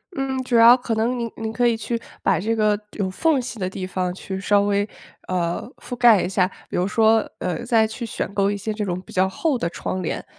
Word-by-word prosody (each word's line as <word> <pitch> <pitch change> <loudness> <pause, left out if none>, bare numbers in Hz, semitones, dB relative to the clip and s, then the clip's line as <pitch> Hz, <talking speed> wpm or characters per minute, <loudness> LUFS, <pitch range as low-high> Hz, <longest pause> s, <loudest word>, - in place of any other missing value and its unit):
嗯， 265 -1 -2
主 245 -1 -1
要 230 +2 +8
可 240 -2 -2
能 235 +3 0
您 235 -1 -2
您 220 0 -4
可 240 +1 +2
以 235 - +2
去 230 +1 -3 0.2
把 190 -4 +2
这 225 +4 0
个 210 -1 +2
有 195 -3 -2
缝 285 - +1
隙 245 -2 -7
的 185 -1 -1
地 185 0 -5
方 185 -1 -2
去 190 +1 -6
稍 200 +1 +3
微， 205 0 +1 0.4
呃， 175 +2 -2
覆 250 - -7
盖 235 -5 +6
一 175 - -2
下。 190 -1 +2 0.2
比 - - -3
如 180 +2 +1
说， 220 +1 +3
呃， 185 +7 -3
再 230 -2 +4
去 225 +2 -5
选 200 - -4
购 200 0 +2
一 205 - -1
些 210 +2 -3
这 210 -1 -3
种 180 -1 -3
比 - - -15
较 185 +1 +2
厚 270 - -1
的 170 - -2
窗 185 +2 -4
帘。 175 - -3
215 Hz, 260 characters per minute, -22 LUFS, 190-235 Hz, 0.4 s, 要